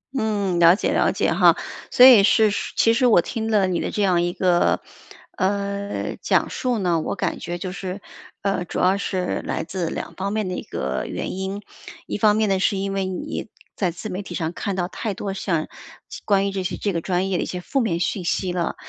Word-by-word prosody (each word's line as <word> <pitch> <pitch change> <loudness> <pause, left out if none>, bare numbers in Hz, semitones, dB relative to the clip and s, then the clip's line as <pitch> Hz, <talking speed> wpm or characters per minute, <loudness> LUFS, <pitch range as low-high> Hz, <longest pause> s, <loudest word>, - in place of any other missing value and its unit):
嗯， 205 -7 0
了 170 +1 +7
解 - - -1
了 - - +3
解 - - 0
哈。 - - +5 0.3
所 250 - +7
以 235 -6 +9
是 215 +1 +4 0.2
其 225 - +4
实 250 +2 +2
我 215 -7 +6
听 225 +4 -4
了 210 -3 +3
你 175 -2 -1
的 - - -2
这 210 - -1
样 180 -3 +3
一 175 0 0
个， 175 -2 +2 0.6
呃， 200 +1 -2
讲 - - +2
述 250 -2 -1
呢， 175 -5 +1
我 - - -3
感 - - -2
觉 175 0 -4
就 180 +1 -5
是， 190 +1 -5 0.4
呃， 195 -2 0
主 - - -6
要 190 +2 +3
是 185 -2 -2
来 - - -2
自 170 0 -3
两 - - -5
方 195 +1 -3
面 215 -3 -1
的 185 - -3
一 - - -4
个 65 0 -3
原 - - -4
因。 190 +2 -4 0.4
一 - - -3
方 210 0 +4
面 215 -1 +2
呢， 195 -1 +1
是 200 +1 +1
因 195 0 -2
为 195 -1 -1
你 185 +4 -4 0.3
在 185 - 0
自 180 +5 -7
媒 185 +2 -4
体 175 -3 -8
上 165 0 -2
看 200 +1 -3
到 180 -1 -1
太 205 +1 -4
多 195 +1 -4
像 170 -5 -1 0.6
关 195 -1 +3
于 - - -2
这 195 -1 -3
些 185 - -3
这 200 -3 -1
个 165 - -1
专 185 +2 0
业 180 - +1
的 - - 0
一 - - -5
些 180 - -4
负 270 +9 -1
面 170 -7 0
信 180 +1 -1
息 180 +1 -1
了。 175 -2 -2
190 Hz, 245 characters per minute, -22 LUFS, 180-205 Hz, 0.6 s, 以